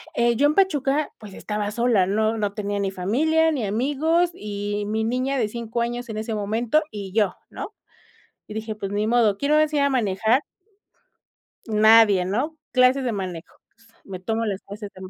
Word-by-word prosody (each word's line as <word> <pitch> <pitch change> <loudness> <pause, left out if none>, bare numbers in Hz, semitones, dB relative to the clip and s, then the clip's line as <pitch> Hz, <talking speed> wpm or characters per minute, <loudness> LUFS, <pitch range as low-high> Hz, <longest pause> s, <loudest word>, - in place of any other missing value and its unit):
eh, 235 0 +2
yo 290 - +3
en 300 - 0
Pachuca, 295 -6 +1
pues, 210 -3 -12
estaba 210 -1 -3
sola, 235 -4 +2
no 220 +3 0
no 205 -2 -1
tenía 205 -1 -3
ni 195 -1 0
familia, 310 - +1
ni 255 -8 -2
amigos, 295 - +1
y 205 - -4
mi 220 +1 -1
niña 255 +4 -1
de 220 -4 0
5 235 +1 -4
años 240 +1 -3
en 215 -1 -6
ese 220 +1 -3
momento, 225 +8 +1
y 200 -3 -7
yo, 210 -1 +1
¿no?, 430 - -7 0.7
y 215 - -9
dije: 220 0 -4
"Pues, 200 -2 -5
ni 205 +1 0
modo, 220 -3 +3
¿quién 280 +1 -1
me - - +5
va - - +5
a - - +6
enseñar 295 -2 +1
a - - +2
manejar?" 220 +2 +1 1.3
Nadie, 215 -3 +5
¿no?, 255 - -2 0.2
clases 255 +1 +4
de 245 - -1
manejo. 185 -5 -6 0.5
Me 185 -2 -7
tomo 225 +3 -1
las 200 -2 -3
clases 205 0 -9
de 185 - -12
ma 185 - -8
220 Hz, 195 wpm, -23 LUFS, 205-260 Hz, 1.3 s, a